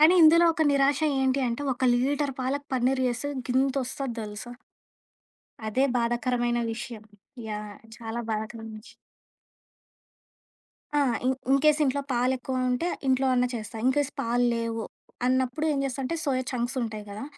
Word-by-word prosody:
కానీ 320 +4 +7
ఇందులో 335 +2 +7
ఒక 320 - 0
నిరాశ 275 +1 +3 0.2
ఏంటి 265 +1 +2
అంటే 235 +5 -3
ఒక 255 +1 -2
లీటర్ 280 +3 +1
పాలకు 280 +3 -2
పన్నీర్ 260 +1 +2
చేస్తే 250 +3 -2 0.2
గింతొస్తది 265 0 0
దెలుసా? 210 +2 -7 1.2
అదే 255 +6 +2
బాధాకరమైన 240 0 0
విషయం. 225 -1 -7 0.4
యాహ్! 210 -1 -5 0.2
చాలా 230 0 -5
బాధాకరమైన 220 0 -4
విషయం. - - -16 2.0
ఆ! - - +4 0.2
ఇన్ 260 +1 +3 0.2
ఇన్‌కే‌స్ 300 +2 +4
ఇంట్లో 275 +1 +1
పాలేక్కువ 255 +1 0
ఉంటే 250 +8 0 0.2
ఇంట్లో 265 0 +3
అన్నా 250 0 +3
చేస్తా. 225 0 -6
ఇన్కేస్ 285 +2 +2
పాలు 245 -1 +1
లేవు 230 -1 -2 0.4
అన్నప్పుడు 260 +3 +1
ఏం 280 - -1
జేస్తంటే 270 +3 -2
సోయ 265 -3 +1
చంక్స్ 245 +1 -2
ఉంటాయి 215 -2 -4
గదా! 205 +6 -6
255 Hz, 135 wpm, -27 LUFS, 235-275 Hz, 2.0 s, కానీ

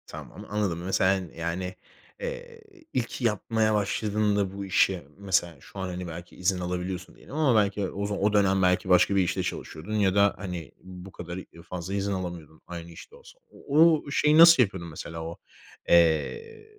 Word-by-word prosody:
Tamam - - -10
anladım. 100 -5 -1
Mes 95 +1 -1
sen 95 -2 +1
yani, 85 +3 -4 0.4
eee, - - -7 0.3
ilk 125 +1 -2
yapmaya 110 -1 +1
başladığında 105 -1 0
bu 100 0 -5
işe 95 -4 +1
mesela, 95 -4 0
şu 100 - -12
an 95 - -3
hani 90 0 -5
belki 85 +1 -9
izin 90 0 0
alabiliyorsun 90 +1 -4
diyelim 140 - -12
ama 150 -6 +3
belki 100 -1 -1
o 100 +1 -4
za 105 - -2
o 105 +1 +1
dönem 95 -2 +3
belki 90 0 +2
başka 90 +2 +4
bir 95 - +4
işte 90 - -1
çalışıyordun 80 +7 -6
ya 100 -3 +2
da 100 0 +4
hani 90 -5 -6
bu 95 +1 -10
kadar 90 0 -7
i 95 - -8 0.2
fazla 90 +1 -5
izin 100 0 -1
alamıyordun 85 -4 -6
aynı 85 -1 -8
işte 445 - -13
olsa. 485 +1 -17
O - - -17 0.4
o 145 - -8
şeyi 150 +1 +3
nasıl 165 -5 +9
yapıyordun 95 -5 -5
mesela? 80 +1 -7
O, 85 +1 -7 0.5
eee, 85 - +2
95 Hz, 180 wpm, -27 LUFS, 90-105 Hz, 0.5 s, nasıl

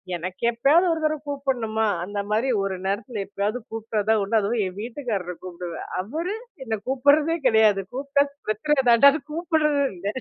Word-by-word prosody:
எனக்கு 180 +4 -6
எப்பயாவது 285 +10 +4
ஒரு 325 - -3
தடவை 310 0 +1
கூப்பிடணுமா? 240 -6 -1 0.2
அந்த 205 +3 -4
மாரி 225 +5 +1
ஒரு 195 -1 -2
நேரத்துல 205 +3 -2
எப்பயாவது 205 +4 -2
கூப்பிட்டதுதான் 220 -1 0
உண்டு. 220 +3 +2
அதுவும் 215 +3 0
என் 185 +1 -9
வீட்டுக்காரர 220 -7 -4
கூப்பிடுவேன். 175 -1 -7
அவரு 325 - -4 0.3
என்னை 220 -2 -2
கூப்பிடுறதே 290 +5 +3
கிடையாது. 220 -4 +4
கூப்பிட்டா 280 +2 +1 0.2
பிரச்சனை 270 +8 +1
தாண்டா 240 +4 +8 0.2
கூப்பிடுறது 310 -4 +1
இல்ல! 180 +3 -6
225 Hz, 145 wpm, -24 LUFS, 205-280 Hz, 0.3 s, தாண்டா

